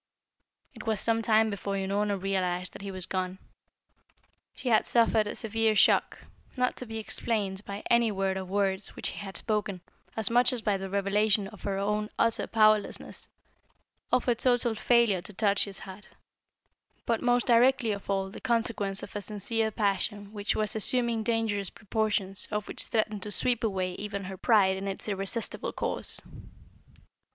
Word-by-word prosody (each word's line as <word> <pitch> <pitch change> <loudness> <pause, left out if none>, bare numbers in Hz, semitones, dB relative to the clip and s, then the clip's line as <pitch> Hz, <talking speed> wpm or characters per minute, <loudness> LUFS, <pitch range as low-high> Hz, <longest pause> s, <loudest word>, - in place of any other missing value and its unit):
It - - -11
was 220 -2 +1
some 225 +1 +2
time 220 0 +3
before 200 0 -3
Unorna 200 +1 0
realised 185 -2 -1
that - - -10
he 200 - -6
was 185 -2 -4
gone. 185 0 -3 1.2
She 255 - -4
had 220 - +3
suffered 225 -2 +3
a - - -4
severe 225 -1 +1
shock, - - +4 0.4
not 250 0 +1
to 250 - -4
be 225 0 -5
explained 210 -3 -2
by 200 +1 -6
any 235 -2 +3
word 195 -1 -1
or 190 - -3
words 195 +1 -1
which - - -4
he - - -8
had 195 -3 -4
spoken, 210 -4 -2 0.4
as 220 0 +1
much 245 +1 +5
as 235 -3 -4
by 205 -2 +2
the 195 0 -5
revelation 200 +1 +1
of 215 - -14
her 195 -1 -2
own 210 +2 -1
utter 230 - +1
powerlessness, 215 -2 +1 0.8
of 250 - +2
her 245 - +3
total 240 -1 +2
failure 225 -4 +3
to 210 - -10
touch 200 0 +2
his 195 -2 -6
heart, 195 +2 -10 1.0
but 230 -2 0
most 245 0 +2
directly 245 0 +4
of 200 -1 -6
all 195 -1 -1
the - - -10
consequence 225 -5 +1
of - - -9
a 205 - -2
sincere 220 +2 -1
passion 205 0 -1
which 205 0 -1
was 215 +1 0
assuming 235 +1 +3
dangerous 220 -4 0
proportions 205 -3 -1
and 210 0 -2
which - - -3
threatened 215 -2 -1
to 210 - -5
sweep 240 +4 0
away 190 -4 -1
even 200 0 -5
her 190 0 -6
pride 190 -1 +3
in 195 +1 -5
its 195 - -5
irresistible 200 +3 -2
course. - - -3
210 Hz, 170 wpm, -28 LUFS, 195-225 Hz, 1.2 s, much